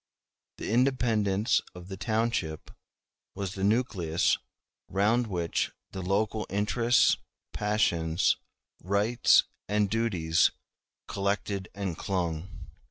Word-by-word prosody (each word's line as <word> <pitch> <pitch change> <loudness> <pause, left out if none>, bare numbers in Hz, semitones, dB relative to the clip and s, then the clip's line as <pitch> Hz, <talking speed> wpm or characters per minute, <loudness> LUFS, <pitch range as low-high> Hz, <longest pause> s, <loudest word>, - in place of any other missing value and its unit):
The - - -4
independence 115 -5 +2
of 90 0 -10
the 95 - -6
township 110 -7 -1 0.6
was 95 -2 -4
the 95 - -5
nucleus 100 -7 +1 0.5
round 110 +5 +2
which 85 -5 -1 0.2
the 95 - -5
local 105 +3 0
interests, 115 +5 +3 0.4
passions, 90 -5 +1 0.5
rights, 105 +6 +4 0.2
and 105 -1 +1
duties 90 -8 +2 0.6
collected 100 -1 -2
and 100 -4 -3
clung. 85 -2 -2
100 Hz, 95 wpm, -28 LUFS, 90-110 Hz, 0.6 s, rights